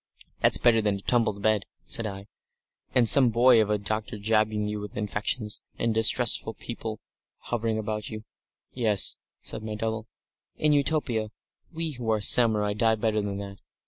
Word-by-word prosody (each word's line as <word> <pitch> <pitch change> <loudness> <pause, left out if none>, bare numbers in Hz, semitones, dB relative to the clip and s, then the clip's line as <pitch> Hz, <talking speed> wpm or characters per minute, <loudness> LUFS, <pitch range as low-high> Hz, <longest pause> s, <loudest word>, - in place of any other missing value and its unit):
"That's - - +5
better 115 -2 +3
than 105 -2 0
a 100 - -7
tumbled 110 -3 0
bed," 110 -2 +1 0.2
said 115 -2 -1
I, 100 -1 -8 0.7
"and 120 -2 +4
some 130 +1 +7
boy 120 0 +5
of 105 - -1
a 105 - +1
doctor 105 +1 -4
jabbing 110 0 0
you 105 0 -4
with 105 0 -8
injections, 105 +1 -2 0.2
and 115 -1 0
distressful 115 0 +3
people 110 -2 -7 0.4
hovering 115 -2 -3
about 105 -1 -4
you." 110 -1 -7 0.5
"Yes," 110 -6 +1 0.2
said - - -5
my 110 0 -5
double; 110 +1 -4 0.5
"in 150 -1 +2
Utopia 140 -7 0 0.4
we 165 -1 -3
who 120 -5 -5
are 110 -1 +2
samurai 105 -1 +3
die 110 +1 +2
better 110 -1 -1
than 100 -1 -4
that.... 100 0 -8
110 Hz, 165 wpm, -26 LUFS, 105-115 Hz, 0.7 s, some